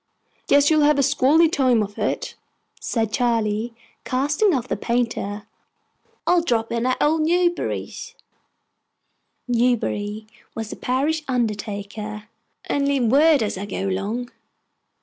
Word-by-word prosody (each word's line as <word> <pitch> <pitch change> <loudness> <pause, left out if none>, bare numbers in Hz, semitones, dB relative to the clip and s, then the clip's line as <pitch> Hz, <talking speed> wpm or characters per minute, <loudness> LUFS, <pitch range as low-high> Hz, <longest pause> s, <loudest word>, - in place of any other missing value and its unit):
"Guess 285 +2 +4
you'll 310 -1 +4
have 295 0 +4
a 280 - +3
squally 290 +4 +4
time 255 -8 +2
of 205 0 -8
it," - - -2 0.5
said 225 -3 -2
Charley, 230 -1 0 0.3
casting 290 +10 +1
off 255 -6 -1
the - - -1
painter. 230 -4 -2 0.8
"I'll 355 -1 +4
drop 230 -8 -1
in 235 +1 0
at 255 - +1
old 315 +2 +2
Newbury's" 345 +2 -1 1.3
(Newbury 225 -3 0 0.3
was 225 -1 -5
the - - -5
parish 285 +5 0
undertaker) 210 -3 -3 0.4
"and 280 -1 0
leave 265 -5 +1
word, 295 -1 +5
as 205 -3 -3
I 200 - -5
go 195 0 -3
along!" 215 +6 -3
245 Hz, 130 wpm, -22 LUFS, 215-285 Hz, 1.3 s, word